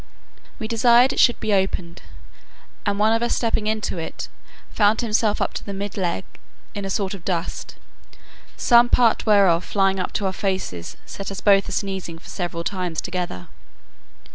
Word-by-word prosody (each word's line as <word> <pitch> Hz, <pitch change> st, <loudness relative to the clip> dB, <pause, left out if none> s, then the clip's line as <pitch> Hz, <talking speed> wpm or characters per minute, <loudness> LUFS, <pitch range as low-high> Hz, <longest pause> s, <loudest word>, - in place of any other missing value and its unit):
We 220 Hz, -, -4 dB
desired 235 Hz, +3 st, +4 dB
it -, -, -3 dB
should 240 Hz, -, +4 dB
be 220 Hz, -2 st, -1 dB
opened, 185 Hz, -3 st, -1 dB, 0.9 s
and 200 Hz, 0 st, +1 dB
one 215 Hz, +2 st, +3 dB
of 225 Hz, -, +1 dB
us 240 Hz, -, +1 dB
stepping 225 Hz, -2 st, 0 dB
into 215 Hz, -4 st, -1 dB
it, 165 Hz, -, -6 dB, 0.4 s
found 210 Hz, 0 st, +3 dB
himself 215 Hz, -2 st, +1 dB
up -, -, -1 dB
to -, -, -5 dB
the 200 Hz, -, -6 dB
mid 200 Hz, 0 st, -5 dB
leg 175 Hz, -, -1 dB, 0.5 s
in 200 Hz, -1 st, -5 dB
a -, -, -3 dB
sort 195 Hz, -1 st, -1 dB
of 190 Hz, -4 st, -9 dB
dust, 175 Hz, -1 st, -3 dB, 0.8 s
some 240 Hz, 0 st, +5 dB
part 235 Hz, -2 st, +3 dB
whereof 195 Hz, -5 st, +5 dB
flying 195 Hz, -1 st, +1 dB
up 180 Hz, -, -2 dB
to 205 Hz, -, -1 dB
our 190 Hz, -, 0 dB
faces 185 Hz, -, -3 dB
set 195 Hz, -, -6 dB
us 195 Hz, -1 st, -5 dB
both 195 Hz, -1 st, +4 dB
a -, -, -5 dB
sneezing 190 Hz, -4 st, -3 dB
for 165 Hz, -, -14 dB
several 175 Hz, -2 st, -4 dB
times 180 Hz, -4 st, -3 dB
together. 175 Hz, -, -4 dB
195 Hz, 175 wpm, -22 LUFS, 180-220 Hz, 0.9 s, some